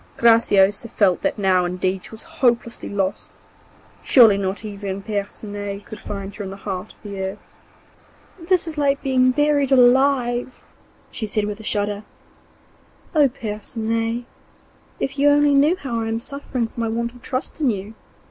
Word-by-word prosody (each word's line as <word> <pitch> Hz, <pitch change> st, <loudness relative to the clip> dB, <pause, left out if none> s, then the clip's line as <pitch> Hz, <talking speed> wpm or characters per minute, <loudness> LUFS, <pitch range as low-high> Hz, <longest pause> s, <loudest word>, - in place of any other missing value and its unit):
Graciosa 225 Hz, -2 st, +4 dB
felt 190 Hz, -5 st, +2 dB
that -, -, -1 dB
now 190 Hz, -3 st, +3 dB
indeed 185 Hz, +1 st, -2 dB
she -, -, -11 dB
was 220 Hz, -, -10 dB, 0.2 s
hopelessly 235 Hz, -2 st, +1 dB
lost, 195 Hz, -1 st, -2 dB, 0.7 s
surely 230 Hz, -6 st, +6 dB
not 200 Hz, +2 st, -3 dB
even 200 Hz, -2 st, -5 dB
Percinet 205 Hz, 0 st, -5 dB
could 215 Hz, -, -9 dB
find 200 Hz, -1 st, -6 dB
her 210 Hz, -, -6 dB
in 190 Hz, -, -5 dB
the 195 Hz, -, -7 dB
heart 195 Hz, 0 st, -5 dB
of -, -, -31 dB
the 200 Hz, -2 st, -6 dB
earth. 190 Hz, +2 st, -3 dB, 1.1 s
'This 365 Hz, -3 st, +3 dB
is 315 Hz, -, -8 dB
like 280 Hz, -1 st, +1 dB
being 255 Hz, -2 st, +3 dB
buried 285 Hz, 0 st, +2 dB
alive,' 250 Hz, -1 st, +3 dB, 0.5 s
she 220 Hz, -, -4 dB
said 210 Hz, 0 st, -1 dB
with 210 Hz, 0 st, -5 dB
a -, -, -10 dB
shudder. 205 Hz, 0 st, -2 dB, 1.1 s
'Oh, 295 Hz, -4 st, +5 dB
Percinet! 225 Hz, 0 st, -3 dB, 0.7 s
if 275 Hz, +1 st, -3 dB
you 290 Hz, +1 st, +5 dB
only 290 Hz, 0 st, +4 dB
knew 290 Hz, +5 st, +4 dB
how 250 Hz, -10 st, -3 dB
I 225 Hz, -, -2 dB
am 225 Hz, 0 st, -1 dB
suffering 265 Hz, -1 st, -4 dB
for 225 Hz, -, -9 dB
my 230 Hz, -, 0 dB
want 235 Hz, +1 st, -2 dB
of 245 Hz, -, -16 dB
trust 260 Hz, +6 st, -4 dB
in 280 Hz, -, +3 dB
you! 205 Hz, 0 st, -4 dB
225 Hz, 165 wpm, -21 LUFS, 200-255 Hz, 1.1 s, surely